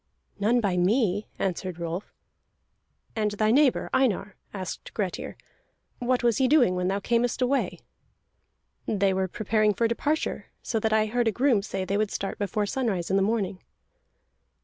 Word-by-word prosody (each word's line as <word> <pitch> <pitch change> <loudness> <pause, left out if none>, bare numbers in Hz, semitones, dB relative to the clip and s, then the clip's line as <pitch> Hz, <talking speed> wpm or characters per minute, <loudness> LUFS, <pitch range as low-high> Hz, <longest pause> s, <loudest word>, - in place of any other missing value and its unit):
"None 230 +4 +3
by 195 -4 0
me," 205 +2 +2
answered 185 -1 -2
Rolf. 170 +3 -5 1.0
"And 215 -2 +1
thy 215 +1 +2
neighbor 275 +1 +3
Einar," 210 -6 +1 0.2
asked 190 -3 -7
Grettir. 195 -5 -3 0.6
"What 250 0 0
was 235 -3 +3
he 260 - +4
doing 255 -9 +4
when 180 0 -1
thou 195 +2 0
earnest 240 +2 +2
away?" 265 +2 0 1.1
"They 195 -2 +2
were 190 0 0
preparing 215 +2 +1
for 230 - +2
departure, 290 +7 -1 0.2
so 225 - -1
that 220 0 0
I 215 0 +3
heard 235 +2 0
a - - +3
groom 245 -2 +2
say 190 -2 -4
they 195 +2 0
would 215 -1 +1
start 195 -1 -4
before 205 +1 -1
sunrise 200 -7 -1
in - - +3
the 195 - +3
morning." 200 -2 -1
210 Hz, 160 wpm, -26 LUFS, 190-240 Hz, 1.1 s, he